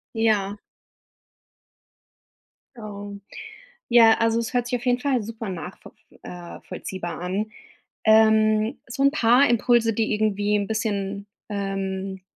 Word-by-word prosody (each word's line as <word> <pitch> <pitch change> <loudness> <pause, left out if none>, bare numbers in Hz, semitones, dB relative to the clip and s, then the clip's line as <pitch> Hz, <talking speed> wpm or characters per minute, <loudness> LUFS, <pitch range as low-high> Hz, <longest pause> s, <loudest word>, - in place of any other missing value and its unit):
Ja. 210 -3 +1 2.2
Ähm. 205 -2 -8 0.7
Ja, 230 -2 +7
also, 230 0 +2
es 230 +1 -4
hört 245 -1 +1
sich 245 -1 -1
auf 240 - -11
jeden 245 0 +2
Fall 260 -4 0
super 225 0 -7
nachvo 180 +1 -8 0.2
f - - -20
äh, 175 -1 -9
vollziehbar 175 -3 -6
an. 195 +5 -3 0.6
Ähm, 220 +1 +4
so 275 - -3
'n 275 - +5
paar 245 +1 +4
Impulse, 235 -1 +3
die 220 0 0
irgendwie 210 -1 0
'n 200 -1 -1
bisschen, 205 -2 -3 0.2
ähm, 195 -1 -3
215 Hz, 125 wpm, -24 LUFS, 200-230 Hz, 2.2 s, Ja